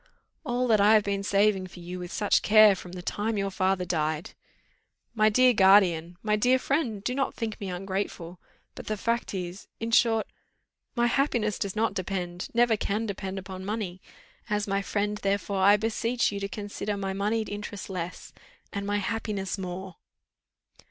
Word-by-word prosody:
"All 250 -3 0
that 215 -3 +4
I 210 +2 +6
have 215 - +4
been 200 -1 -1
saving 200 -1 +2
for 180 - -13
you 175 +1 -7
with 180 -1 -7
such 205 -2 +2
care 215 -1 +7
from 180 -1 -10
the 180 -1 -7
time 215 +3 -2
your 195 0 -1
father 190 -1 0
died!" 155 -2 -1 0.8
"My 215 -1 +4
dear 255 +3 +5
guardian, 185 -4 +4
my 210 -1 +2
dear 250 +5 +3
friend, 255 -7 -1
do 250 - -1
not 270 +1 -1
think 220 -3 -4
me 195 - -4
ungrateful; 180 -2 -4 0.3
but - - -10
the 215 - -2
fact 230 0 -1
is, 180 +1 -6
in 230 0 -3
short, 225 -1 +4 0.7
my 240 -1 +2
happiness 240 -4 +1
does 200 0 -3
not 225 0 +1
depend, 180 -2 -4
never 235 -1 +3
can 210 +1 -1
depend, 195 -2 -4
upon 190 0 -7
money; 195 -3 -4 0.5
as 210 0 0
my 195 0 0
friend, 205 +1 -2
therefore, 200 0 -1
I 200 +2 +6
beseech 230 +2 0
you 200 - -4
to 200 - -3
consider 205 0 -4
my 195 -1 -3
moneyed 215 +3 -1
interest 205 -1 -6
less, 180 -2 -6 0.4
and 200 0 -3
my 205 0 +1
happiness 205 -2 -3
more." 185 0 -6
200 Hz, 175 wpm, -27 LUFS, 190-220 Hz, 0.8 s, care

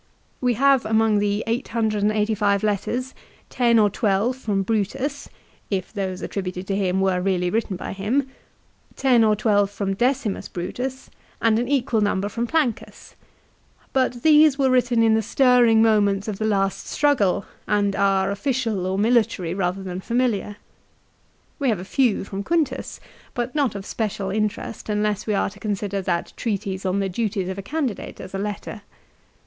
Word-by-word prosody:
We 250 -2 +2
have 275 +1 +4
among 220 -1 +2
the 205 +1 0
885 215 -3 0
letters 235 +5 -1 0.4
ten 235 -2 +3
or 215 -2 +5
twelve 210 +4 +1
from 205 -7 -1
Brutus, 230 +8 -2 0.4
if 190 -1 -3
those 190 -3 -3
attributed 185 -1 -4
to 195 - -2
him 190 -1 0
were 190 -2 +1
really 180 -2 0
written 220 -2 -1
by - - -5
him; 230 +8 0 0.7
ten 250 -4 +4
or 215 -1 +4
twelve 205 -2 +2
from 200 -1 -2
Decimus 245 0 0
Brutus, 250 +9 -5 0.3
and 225 -1 +3
an 240 - -1
equal 245 -5 +1
number 205 -1 0
from 235 +3 -3
Plancus; 275 -6 -2 0.8
but 255 -2 0
these 305 -2 +6
were 270 -2 +2
written 245 -2 +3
in 225 -1 +4
the 220 - +3
stirring 235 -1 +4
moments 205 -2 +2
of 210 -3 -4
the 215 - -1
last 195 -2 0
struggle, 230 -11 +1 0.2
and 205 -1 +1
are 195 -1 +2
official 225 -4 -1
or 190 +1 -1
military 210 -6 +1
rather 190 0 -2
than 185 0 -5
familiar. 230 -3 -1 1.0
We 275 -3 +1
have 220 - +1
a 185 - -7
few 245 +1 +1
from 195 0 -5
Quintus, 300 +1 -1 0.4
but 245 0 -2
not 280 -8 0
of 195 -1 -6
special 205 -4 -3
interest 215 +1 -3
unless 210 0 -1
we 210 - +1
are 195 - 0
to - - -15
consider 200 -1 -2
that 175 -2 -2
treatise 195 -3 -3
on 190 +2 0
the 195 - 0
duties 195 -1 -2
of 190 +1 -4
a - - -3
candidate 265 +1 -4
as 190 - -9
a 195 - -3
letter. 210 +1 -5
210 Hz, 165 wpm, -23 LUFS, 195-240 Hz, 1.0 s, these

